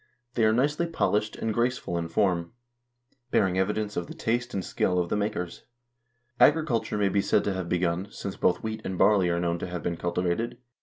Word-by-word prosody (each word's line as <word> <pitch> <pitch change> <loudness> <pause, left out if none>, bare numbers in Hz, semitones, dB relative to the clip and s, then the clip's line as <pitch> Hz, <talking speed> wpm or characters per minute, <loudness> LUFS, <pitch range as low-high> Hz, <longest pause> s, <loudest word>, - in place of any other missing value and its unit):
They 115 -2 +2
are 110 - +5
nicely 145 +8 +1
polished 105 -10 0
and 110 - -2
graceful 120 -5 -1
in 85 -1 -1
form, 85 0 0 0.8
bearing 95 -6 +2
evidence 105 +2 -1
of 85 -1 -2
the - - -9
taste 120 +1 -1
and 95 -2 -3
skill 90 - 0
of 90 -1 0
the - - 0
makers. 100 -4 -2 0.8
Agriculture 145 -9 +3
may 100 -1 +2
be 100 +1 +2
said - - +2
to 100 - 0
have 95 -2 -4
begun, 90 +2 0
since 100 -2 -6
both 90 - +1
wheat 110 0 -3
and 95 -1 -4
barley 100 -3 +4
are 85 0 +1
known 85 0 0
to - - -4
have 90 -1 -5
been 85 -1 -2
culti 90 +1 -1
vated. 90 +7 -1
100 Hz, 205 wpm, -27 LUFS, 90-110 Hz, 0.8 s, are